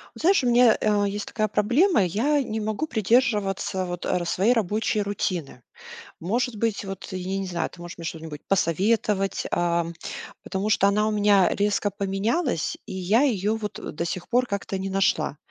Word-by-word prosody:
Знаешь, 355 -4 +3
у - - +1
меня, 240 -1 +5
э, 205 -1 +2
есть 205 +1 -4
такая 215 -1 -1
проблема: 240 - +3
я 270 - +1
не 220 -2 -3
могу 215 +7 -2
придерживаться 210 -6 +1
вот, 175 -1 -5
а, 180 -1 0
своей 190 +6 +2
рабочей 215 -1 0
рутины. 185 -9 -3 0.6
Может 230 +6 -1
быть, 220 -1 -1
вот, 195 -1 -7
я 185 +1 -3
не 195 - -2
знаю, 170 -2 -2
ты - - -16
можешь 175 0 -9
мне 170 - -8
что-нибудь 160 -2 -6
посоветовать, 195 +2 +1
а, 170 -1 +1 0.6
потому 195 +2 -2
что 200 -2 +4
она 210 +2 +2
у - - 0
меня 205 -2 +4
резко 205 0 0
поменялась, 200 - -1
и - - -8
я 190 +6 +2
её 215 -6 +1
вот, 215 -2 -5
э, - - -6
до 170 - -3
сих 170 +1 -4
пор 250 +1 +2
как-то 200 -2 -3
не 190 +1 -4
нашла. 195 -6 +1
205 Hz, 180 wpm, -25 LUFS, 185-220 Hz, 0.6 s, меня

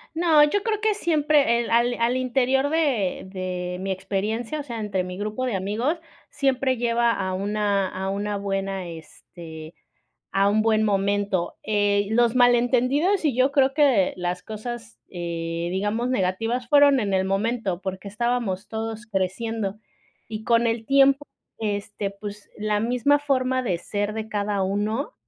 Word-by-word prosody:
No, 320 -3 +5
yo 395 +7 +2
creo 435 -2 -1
que 435 -1 +2
siempre 300 - +2
el 235 - -5
al 240 +1 +3
al 240 +2 +1
interior 265 +2 +1
de 275 - 0
de 180 -1 -4
mi 195 +1 -3
experiencia, 210 +8 -2
o - - -4
sea, 235 -5 -6
entre 195 -3 -1
mi 180 0 -6
grupo 215 +5 -3
de 235 -6 -1
amigos, 225 - -1 0.3
siempre 270 -2 +1
lleva 235 0 +2
a 190 -3 -2
una 200 0 0
a 190 +1 -4
una 205 +1 -2
buena, 195 -2 -3
este, 160 0 -11 0.6
a 195 +1 +3
un 215 +1 +2
buen 220 -1 +3
momento. 200 -3 0
Eh, 205 -1 +1
los 235 +1 +3
malentendidos 255 +9 +3
y 270 -5 0
yo 260 +2 +3
creo 270 -1 +3
que 270 -11 +3
las 180 0 -3
cosas, 225 +1 -7
eh, 170 -1 -3
digamos 210 +6 -1
negativas, 225 +3 -1
fueron 285 -2 +6
en 200 -3 -1
el 190 0 +1
momento, 195 -1 -1
porque 190 +1 -5
estábamos 220 -3 -1
todos 225 +1 -5
creciendo. 205 +1 -2 0.5
Y 220 -1 -6
con 235 0 +3
el 225 -1 -1
tiempo 275 +1 +4 0.3
este, 205 -1 -3
pues, 205 +1 -9
la 210 0 0
misma 250 +5 +2
forma 260 -2 0
de 185 -8 0
ser 205 +4 -3
de 220 0 -4
cada 205 -1 -1
uno, 210 - -1
220 Hz, 155 wpm, -24 LUFS, 195-255 Hz, 0.6 s, fueron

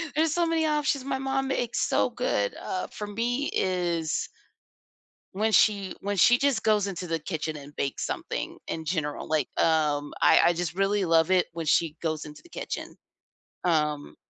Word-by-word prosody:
There's 315 0 +2
so 345 0 +2
many 330 -1 +1
options 295 -3 0
my 275 -1 -1
mom 270 0 -1
makes 245 -3 -1
so - - +2
good, - - -1
uh, 370 -1 -4
for 210 - -7
me 240 +6 -1
is 175 -4 0 1.1
when 215 +3 +1
she 200 -3 +3
when 205 +1 -2
she 240 +8 +6
just 275 -2 +1
goes 210 -2 +3
into 180 -2 -5
the 165 -1 -1
kitchen 155 -1 -4
and 145 0 -12
bakes 140 - -2
something, - - -4
in 160 -1 -4
general, 155 -3 -2
like, 155 -4 0
um, 150 -3 +1
I - - +6
I 175 - +5
just 175 0 -3
really 195 +1 +1
love 165 +1 +3
it 185 -1 +3
when 165 -1 -4
she 155 +1 +2
goes 155 -2 -2
into 150 0 -11
the 345 - -18
kitchen. - - -6 0.7
Um 150 -4 0
185 Hz, 175 wpm, -27 LUFS, 160-255 Hz, 1.1 s, she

